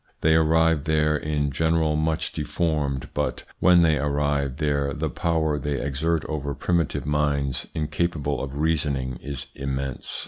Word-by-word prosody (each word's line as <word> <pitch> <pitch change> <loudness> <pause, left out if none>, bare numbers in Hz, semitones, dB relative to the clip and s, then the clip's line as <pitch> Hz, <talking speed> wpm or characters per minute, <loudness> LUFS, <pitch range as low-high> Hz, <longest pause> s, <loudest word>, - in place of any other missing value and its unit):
They 80 - +4
arrive 80 -1 +3
there 75 -1 +2
in 75 -1 -1
general 80 +1 +1
much 80 +1 0
deformed, 75 -5 -1
but - - -2 0.2
when 90 -1 +6
they 80 -3 +3
arrive 70 -1 0
there 70 -2 0
the 75 0 -2
power 80 0 0
they 70 0 -2
exert 75 +4 -1
over 70 -2 -3
primitive 85 -5 0
minds 70 -3 0
incapable 75 -2 -1
of 70 +1 -5
reasoning 70 -5 0
is 70 -1 -5
immense. 70 -1 -4
75 Hz, 140 wpm, -25 LUFS, 70-80 Hz, 0.2 s, when